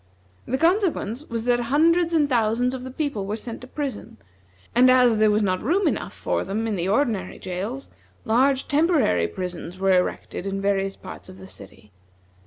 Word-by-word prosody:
The 260 - 0
consequence 330 - +1
was 230 -1 -3
that 245 -1 +3
hundreds 330 +7 +2
and 300 -3 +3
thousands 240 0 +1
of 255 -1 -5
the 260 - -6
people 260 -7 -3
were 210 - -2
sent 225 +1 -8
to 255 - -10
prison, 275 - -5 0.6
and 250 +3 +6
as 250 -3 +5
there 215 0 +4
was 210 +1 +2
not 185 -2 0
room 365 - +1
enough - - -2
for - - -1
them 215 +4 -3
in 220 -2 -1
the 175 -1 -2
ordinary 220 -1 0
jails, 195 +9 -5 0.3
large 260 +4 +2
temporary 290 - +2
prisons 180 - -6
were 195 0 +2
erected 180 +1 -1
in 195 0 -2
various 195 -1 0
parts - - -10
of 185 - -12
the 190 - -11
city. 105 - -12
230 Hz, 185 wpm, -24 LUFS, 195-275 Hz, 0.6 s, and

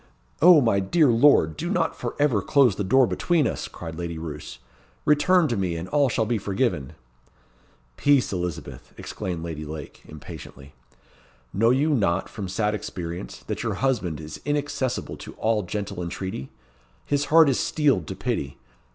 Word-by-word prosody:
"O, 170 -1 +8
my 115 -6 +2
dear 145 - +3
lord! 115 - +4
do - - -4
not - - 0
for - - -5
ever 145 -8 +2
close 130 -2 +3
the 100 - -2
door 130 +7 +4
between 165 +5 +1
us!" - - -2
cried 80 -1 -8
Lady 85 -1 -4
Roos. 75 -5 -7 0.5
"Return 160 +3 +4
to 120 - -1
me, 95 -4 -1
and 85 +2 -5
all 145 -2 +3
shall 115 -2 0
be 115 0 0
forgiven." 100 - -1 1.0
"Peace, 140 -7 +3
Elizabeth!" 90 -3 -5
exclaimed 85 -3 -5
Lady 80 -2 -5
Lake, 75 -1 -8
impatiently. 75 -2 -11 0.8
"Know 115 +4 +3
you 140 +5 +2
not, 100 - +1
from 100 -3 -6
sad 105 +3 0
experience, 90 -4 -6
that - - -4
your - - -2
husband 105 - -1
is 75 -1 -8
inaccessible 145 -3 -2
to - - -10
all 110 -1 0
gentle 100 0 -5
entreaty? 85 -5 -5 0.6
His 145 0 0
heart 160 +1 +6
is 135 - +2
steeled 135 - +1
to - - -5
pity. 70 -1 -3
105 Hz, 160 wpm, -24 LUFS, 85-140 Hz, 1.0 s, O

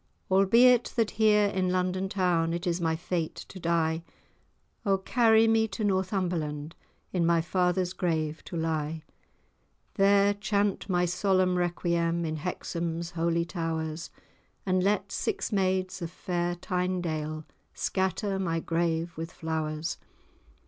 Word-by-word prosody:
Albeit 235 +6 +6
that 225 -3 +1
here 210 -1 +4
in 185 -2 0
London 185 +1 0
town 175 -5 +1
It 175 +2 -4
is 175 0 0
my 160 -1 +1
fate 170 -1 -3
to 190 - -10
die, 165 -1 +1 0.8
O 195 -1 +2
carry 225 +2 +4
me 225 0 +3
to 215 +1 -5
Northumberland, 180 -6 -1 0.4
In 180 -2 +1
my 170 0 +3
father's 180 +1 0
grave 160 -4 -1
to 170 - -5
lie: 160 -1 -2 0.9
There 200 0 +4
chant 205 -1 -1
my 180 -1 +2
solemn 185 +1 +2
requiem 170 -1 0
In 155 0 -2
Hexham's 170 0 -3
holy 170 0 0
towers, 165 -2 -3 0.6
And 185 -1 +2
let 205 +2 +1
six 410 - -2
maids 185 -2 0
of 170 - -3
fair 175 0 -2
Tynedale 175 -4 -2 0.3
Scatter 190 +1 -1
my 165 -3 0
grave 165 0 -1
with 165 +1 -5
flowers. 160 0 -3
180 Hz, 130 wpm, -28 LUFS, 165-190 Hz, 0.9 s, Albeit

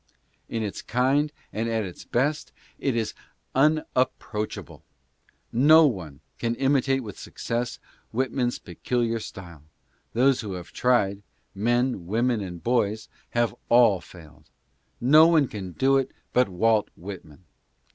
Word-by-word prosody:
In 115 -1 -2
its 100 -3 -4
kind, 135 +5 +1 0.2
and 115 +2 -1
at 110 -1 0
its 90 -3 -8
best, 145 +5 -1 0.3
it 135 -4 0
is 115 -2 -1 0.4
unap 145 -2 +3
proachable. 105 -1 -6 0.7
No 155 +6 +7
one 85 - -3 0.2
can 115 0 -1
imitate 135 0 +1
with 105 -3 -9
success 120 +1 -4 0.3
Whitman's 125 0 -1
pecu 120 +7 -2
liar 115 0 -1
style; 85 -8 -10 0.5
those 130 +3 +3
who 105 -4 -5
have 90 -2 -8
tried 100 -6 +2 0.2
— - - -44
men, 120 -2 0
women 115 +2 +1
and 90 -3 -7
boys 110 -3 0
— - - -34
have 120 -4 +2 0.2
all 115 -6 +5
failed. 75 -4 -16 0.5
No 155 +6 +7
one 160 -5 +4
can 100 -7 -7
do 135 +5 +3
it 135 -1 0 0.2
but 125 -4 +3
Walt 110 +3 +2
Whitman. 85 -3 -10
115 Hz, 140 wpm, -25 LUFS, 100-130 Hz, 0.7 s, No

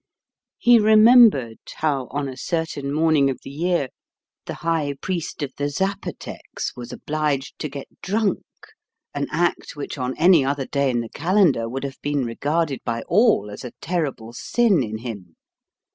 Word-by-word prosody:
He 240 -1 +6
remembered 215 - +6 0.2
how 140 -5 -1
on 140 +1 -3
a 130 - -6
certain 145 -1 -3
morning 155 -2 +3
of 130 - -2
the - - -8
year 165 -2 0 0.6
the - - -4
High 160 -4 0
Priest 170 -4 -4
of 135 -2 -5
the 145 0 -1
Zapotecs 190 +7 -4
was 120 -1 -8
obliged 150 -3 -2
to 150 - -3
get 140 0 -8
drunk, 210 0 0 0.7
an 145 0 -2
act 170 0 -1
which 145 0 -6
on 125 0 -3
any 170 -3 +6
other 135 0 -1
day 140 0 0
in 120 -2 0
the 115 - -7
calendar 170 - +2
would 135 +3 -4
have 140 -1 -6
been 145 -2 -1
regarded 145 +4 -1
by 115 0 -3
all 170 - +3
as 105 - -9
a 125 - -7
terrible 140 -10 -3
sin 220 - +2
in 110 -3 -3
him. 105 -8 -8
145 Hz, 160 wpm, -22 LUFS, 130-170 Hz, 0.7 s, He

